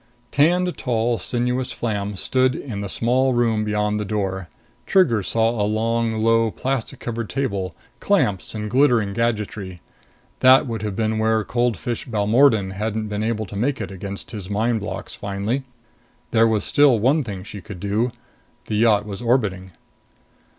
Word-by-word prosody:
Tanned, 175 +5 +3
tall, 115 -2 0
sinuous 125 +5 -1
Flam 105 -3 -3
stood 130 +6 +1
in 110 -7 -5
the 100 - -4
small 130 +5 +1
room 115 -3 +1
beyond 105 0 0
the - - -1
door. 95 -4 -3 0.4
Trigger 135 - +4
saw 115 +3 +1
a 115 -3 -2
long, 115 +1 0
low, 115 +1 +2
plastic 130 +1 -3
covered 115 -2 -4
table, 100 -10 -2 0.2
clamps 125 - 0
and 105 0 -3
glittering 120 -4 +3
gadgetry. 105 -5 -2 0.6
That 130 +1 +6
would 115 -4 -4
have 105 -2 -3
been 110 +1 0
where 110 0 +2
cold 120 -1 0
fish 120 +11 -4
Balmordan 110 -1 +3
hadn't 110 +2 -3
been 105 0 -2
able 110 -1 -1
to 100 - -10
make 125 +7 0
it - - -5
against 100 +1 -7
his 100 -5 -7
mind 110 +3 +1
blocks 100 -2 -6
finally. 105 +7 -3 0.7
There 115 0 +5
was 110 -2 +1
still 145 -4 +4
one 135 +8 +2
thing 100 -6 -6
she 100 - -9
could 100 -2 -9
do. 105 +6 0 0.5
The 105 - -2
yacht 105 -2 +4
was 100 +1 -6
orbiting. 105 -7 0
110 Hz, 160 wpm, -22 LUFS, 105-120 Hz, 0.7 s, That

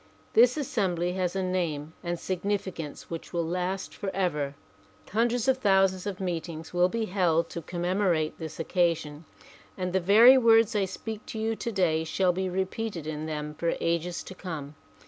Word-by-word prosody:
This 240 +5 +6
assembly 180 - 0
has 185 -1 -1
a 190 - 0
name 165 -5 -2
and 175 -1 -2
sig 185 -2 -3
nificance 190 -7 -3
which 165 -1 -7
will 170 -1 0
last 180 +3 -2
forever. 175 -8 -2 0.5
Hundreds 235 +3 +1
of 260 0 +3
thousands 195 -3 +3
of 200 -1 -4
meet 175 -3 -2
ings 160 -1 -7
shall 180 0 +3
be 230 +2 -1
held 175 -4 +1
to 170 - -5
commemorate 175 -1 0
this 160 -1 -7
occasion 165 -3 0 0.5
and 180 -1 -2
the 190 - +3
very 225 +8 +7
words 225 -1 +5
I 200 -2 +2
speak 215 +3 -7
to - - -6
you 225 +1 0
today 180 -9 0
shall 180 +3 +1
be 190 +1 -2
repeated 190 -1 -3
in 155 0 -4
them 150 -1 -4
for 165 +2 -1
ages 170 +1 -1
to - - -9
come. 160 -6 -6
180 Hz, 170 wpm, -28 LUFS, 165-200 Hz, 0.5 s, very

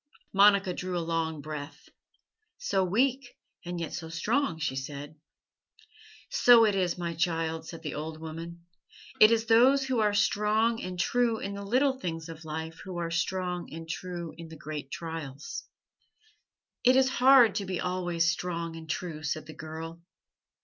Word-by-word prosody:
Monica 200 -1 +5
drew 180 0 -3
a - - +1
long 160 -2 -1
breath. 145 -1 -7 0.7
"So 195 - 0
weak 245 +7 0 0.3
and 175 0 -4
yet 165 - -4
so 165 -2 -5
strong," 195 - 0
she 155 -4 -2
said. 140 +2 -6 1.2
"So 235 -2 +7
it 210 - +2
is, 185 -3 0
my 170 -1 -3
child," 165 -1 -1
said 165 -1 -9
the 150 - -4
old 155 +1 -5
woman. 165 +2 -8 0.5
"It 215 - +9
is 230 0 +2
those 255 +5 +5
who 260 -3 0
are 210 -1 +2
strong 215 +3 +2
and 180 -1 -5
true 235 +4 +2
in 200 -1 -4
the 200 - -6
little 260 +6 +1
things 165 -5 -4
of 160 0 -9
life 160 +1 -5
who 185 -2 -6
are 170 -1 -2
strong 180 +1 -2
and 165 +1 -8
true 170 0 -5
in 165 - -8
the 160 0 -11
great 150 -3 -6
trials." 155 -3 -6 1.2
"It 255 +1 +6
is 265 0 +5
hard 255 -5 +7
to 200 -1 -2
be 185 -2 -2
always 175 -2 0
strong 170 -1 -2
and 160 -1 -10
true," 155 -1 -3
said 155 +1 -3
the 155 - -10
girl. 160 +3 -8
175 Hz, 165 wpm, -29 LUFS, 160-210 Hz, 1.2 s, It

